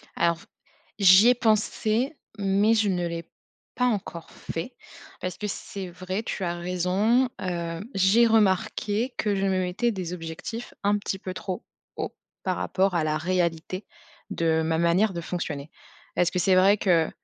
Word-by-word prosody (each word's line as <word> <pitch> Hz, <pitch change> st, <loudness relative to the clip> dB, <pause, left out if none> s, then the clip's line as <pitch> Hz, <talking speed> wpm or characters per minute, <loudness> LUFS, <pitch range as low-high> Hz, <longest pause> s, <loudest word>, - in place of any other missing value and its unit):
Alors, 170 Hz, 0 st, +1 dB, 0.6 s
j'y 195 Hz, +4 st, +8 dB
ai 250 Hz, -, +5 dB
pensé, 225 Hz, +4 st, +1 dB, 0.2 s
mais 200 Hz, +2 st, +3 dB
je 220 Hz, -2 st, +2 dB
ne 175 Hz, -2 st, 0 dB
l'ai 170 Hz, 0 st, -6 dB, 0.5 s
pas 250 Hz, -, +1 dB
encore 195 Hz, -8 st, -2 dB
fait. 245 Hz, +10 st, -6 dB, 0.5 s
Parce 180 Hz, 0 st, -4 dB
que 210 Hz, -, -3 dB
c'est 195 Hz, -2 st, -6 dB
vrai, 185 Hz, +4 st, -4 dB
tu 195 Hz, -, -4 dB
as 175 Hz, -1 st, -1 dB
raison. 185 Hz, +8 st, +1 dB
Hem, 170 Hz, 0 st, -3 dB
j'ai 195 Hz, +5 st, +5 dB
remarqué 220 Hz, +2 st, +1 dB
que 210 Hz, -2 st, 0 dB
je 195 Hz, 0 st, 0 dB
me 190 Hz, -1 st, +1 dB
mettais 185 Hz, +7 st, 0 dB
des 185 Hz, -4 st, -4 dB
objectifs 170 Hz, +7 st, -6 dB
un 205 Hz, +1 st, +3 dB
petit 195 Hz, -1 st, -4 dB
peu 185 Hz, -1 st, -5 dB
trop 185 Hz, +2 st, -5 dB, 0.3 s
hauts, -, -, -4 dB, 0.3 s
par 185 Hz, -1 st, -1 dB
rapport 190 Hz, 0 st, +1 dB
à 165 Hz, -, +2 dB
la 155 Hz, 0 st, 0 dB
réalité, 175 Hz, +2 st, -1 dB, 0.4 s
de 160 Hz, -1 st, +1 dB
ma 160 Hz, 0 st, 0 dB
manière 175 Hz, +5 st, +3 dB
de 170 Hz, -, -4 dB
fonctionner. 155 Hz, -4 st, -4 dB, 0.5 s
Parce 175 Hz, -, +2 dB
que 180 Hz, -, -1 dB
c'est 185 Hz, +1 st, +4 dB
vrai 195 Hz, +3 st, +5 dB
que, 170 Hz, -5 st, +3 dB
185 Hz, 165 wpm, -26 LUFS, 170-210 Hz, 0.6 s, j'y